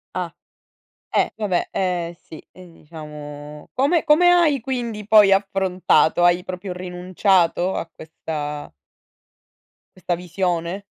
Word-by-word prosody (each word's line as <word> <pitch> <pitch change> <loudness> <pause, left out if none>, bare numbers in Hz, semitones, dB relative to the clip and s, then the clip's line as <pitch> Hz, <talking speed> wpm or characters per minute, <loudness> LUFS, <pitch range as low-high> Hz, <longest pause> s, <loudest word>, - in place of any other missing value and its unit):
Ah, - - -3 0.8
eh, - - +1
vabbè, 205 -5 -1
eh 175 -2 -2
sì, 160 - -12
e 185 -2 -14
diciamo 150 -2 -10
come 290 +6 +1
come 330 +3 +5
hai 315 -7 +3
quindi 235 -4 -4
poi 210 -2 +6
affrontato 190 -3 +2
hai 175 +1 +4
proprio 185 0 -6
rinunciato 180 0 0
a - - -3
questa 150 -2 -6 1.3
questa 180 -1 -2
visione 180 +1 -3
180 Hz, 110 wpm, -21 LUFS, 165-205 Hz, 1.3 s, poi